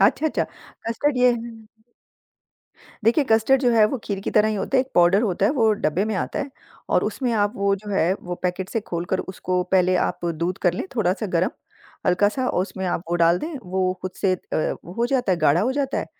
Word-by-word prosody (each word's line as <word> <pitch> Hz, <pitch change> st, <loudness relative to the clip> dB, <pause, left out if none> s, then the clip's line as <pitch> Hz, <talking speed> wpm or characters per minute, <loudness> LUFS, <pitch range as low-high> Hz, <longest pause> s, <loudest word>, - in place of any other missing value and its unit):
अच्छा, 220 Hz, +10 st, +3 dB
अच्छा। -, -, 0 dB, 0.4 s
कस्टर्ड 255 Hz, +4 st, 0 dB
ये 250 Hz, 0 st, +5 dB
है 230 Hz, -1 st, -7 dB, 1.4 s
देखिए, 240 Hz, +6 st, +4 dB
कस्टर्ड 225 Hz, +4 st, +4 dB
जो 245 Hz, -, +4 dB
है 220 Hz, -2 st, +6 dB
वो 255 Hz, +3 st, -3 dB
खीर 195 Hz, -2 st, -3 dB
की -, -, -3 dB
तरह 215 Hz, 0 st, +4 dB
ही 215 Hz, -, -1 dB
होते, 260 Hz, +6 st, 0 dB
एक 265 Hz, -, -5 dB
पाउडर 175 Hz, +5 st, +5 dB
होता 195 Hz, -2 st, +1 dB
है, -, -, +2 dB
वो 225 Hz, -6 st, +3 dB
डब्बे 190 Hz, 0 st, 0 dB
में 220 Hz, -, -2 dB
आता 190 Hz, -, -2 dB
है 275 Hz, -, -3 dB, 0.4 s
और -, -, +2 dB
उसमें 250 Hz, -3 st, -1 dB
आप 205 Hz, -2 st, +1 dB
वो 200 Hz, 0 st, +2 dB
जो 205 Hz, +1 st, -9 dB
है 185 Hz, -3 st, +2 dB
वो 180 Hz, 0 st, -4 dB
पैकेट 180 Hz, +1 st, -2 dB
से 225 Hz, -, -2 dB
खोलकर 175 Hz, -1 st, -3 dB
उसको 185 Hz, -1 st, -2 dB
पहले 185 Hz, -1 st, +4 dB
आप 175 Hz, -, -1 dB
दूध 170 Hz, +2 st, -2 dB
कर 175 Hz, -, +4 dB
लें -, -, -4 dB
थोड़ा 200 Hz, -6 st, +2 dB
सा 210 Hz, +2 st, -4 dB
गर्म, 180 Hz, -1 st, +1 dB, 0.6 s
हल्का 185 Hz, +3 st, +4 dB
सा 255 Hz, +5 st, -2 dB
और 180 Hz, -, +1 dB
उसमें 190 Hz, 0 st, -6 dB
आप 175 Hz, -1 st, -1 dB
वो -, -, +1 dB
डाल 170 Hz, +1 st, +4 dB
दें, 315 Hz, -, -5 dB
वो 185 Hz, 0 st, 0 dB
खुद 185 Hz, -, -3 dB
से 190 Hz, -, +3 dB
अ, -, -, -8 dB, 0.5 s
वो 175 Hz, -, -9 dB
हो 235 Hz, +4 st, 0 dB
जाता 245 Hz, -6 st, +1 dB
है, 175 Hz, -, 0 dB
गाढ़ा 155 Hz, +1 st, +3 dB
हो 250 Hz, +5 st, +1 dB
जाता 275 Hz, 0 st, -1 dB
है -, -, -3 dB
200 Hz, 235 wpm, -23 LUFS, 180-235 Hz, 1.4 s, है